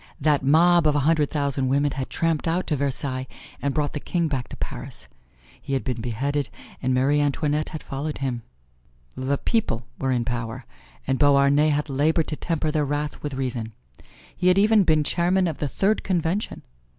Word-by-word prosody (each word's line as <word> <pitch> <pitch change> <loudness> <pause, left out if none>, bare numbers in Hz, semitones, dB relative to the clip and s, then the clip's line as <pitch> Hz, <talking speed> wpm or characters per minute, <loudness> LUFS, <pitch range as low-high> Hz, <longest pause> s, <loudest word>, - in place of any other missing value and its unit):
That 145 0 +2
mob 165 +4 +5
of 150 - +3
a 145 - +2
hundred 150 0 +2
thousand 140 -3 -1
women 140 +2 +2
had 135 -1 -4
tramped 165 -1 0
out 170 +3 0
to 155 - 0
Versailles 130 -1 -2 0.3
and 140 - 0
brought 145 0 -1
the 145 - -3
king 170 +2 -1
back 135 -5 -2
to - - -9
Paris. - - -7 0.5
He 140 - -5
had 135 - 0
been 125 -4 -3
beheaded, 135 +5 -2 0.3
and 130 - 0
Marie 135 +3 +3
Antoinette 145 +1 0
had 155 - -7
followed 145 +3 -4
him. 130 -3 -2 0.7
The 135 +2 -1
people 125 - -1
were 135 - -1
in 120 -2 +1
power 120 +1 -4 0.4
and 130 0 0
Beauharnais 145 +1 +5
had 150 0 0
labored 155 +4 +1
to 155 - -2
temper 160 -1 -1
their 150 -1 +1
wrath 145 +1 -3
with 145 -2 -4
reason. 120 -4 -3 0.6
He 180 - 0
had 180 +1 +5
even 210 +1 +5
been 155 -2 +3
Chairman 180 +4 +2
of 160 - -3
the 145 - -2
Third 200 +9 +1
Convention. 180 +2 -1
145 Hz, 185 wpm, -24 LUFS, 135-160 Hz, 0.7 s, mob